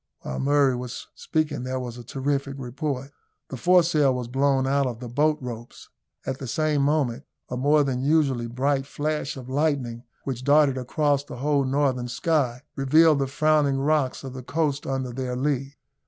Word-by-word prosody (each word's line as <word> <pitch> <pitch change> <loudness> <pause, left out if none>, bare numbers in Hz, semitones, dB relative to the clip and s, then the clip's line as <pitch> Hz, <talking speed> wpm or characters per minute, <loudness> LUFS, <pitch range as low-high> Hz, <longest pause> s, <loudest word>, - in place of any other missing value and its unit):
While 65 - -5
Murray 140 -2 +3
was 125 -1 -6
speaking 155 -4 -1
there 130 +1 -3
was 120 -2 -6
a - - -9
terrific 135 +2 -2
report. 135 +1 -4 0.4
The - - -5
foresail 160 -3 +4
was 125 -2 -4
blown 135 +1 +2
out 140 0 +2
of 120 -2 -5
the 125 - -7
bolt 150 +5 +2
ropes. 120 -2 -8 0.4
At 135 0 -3
the 135 - -6
same 155 +1 +1
moment 140 -2 0 0.2
a - - -3
more 145 +4 +3
than 130 -2 -1
usually 135 -5 +2
bright 135 +3 0
flash 150 -1 -3
of 125 -2 -9
lightning, 130 -4 -1 0.2
which 130 -2 -4
darted 145 -1 +4
across 145 +2 +1
the 125 - -9
whole 140 +1 +1
northern 130 -2 0
sky, 125 -2 0
revealed 155 +3 +4
the 135 - 0
frowning 150 -1 +2
rocks 140 -1 0
of 135 -1 -7
the 130 - -7
coast 145 +1 -1
under 130 -2 -2
their 125 0 -3
lee. 135 +1 -1
135 Hz, 175 wpm, -25 LUFS, 125-145 Hz, 0.4 s, foresail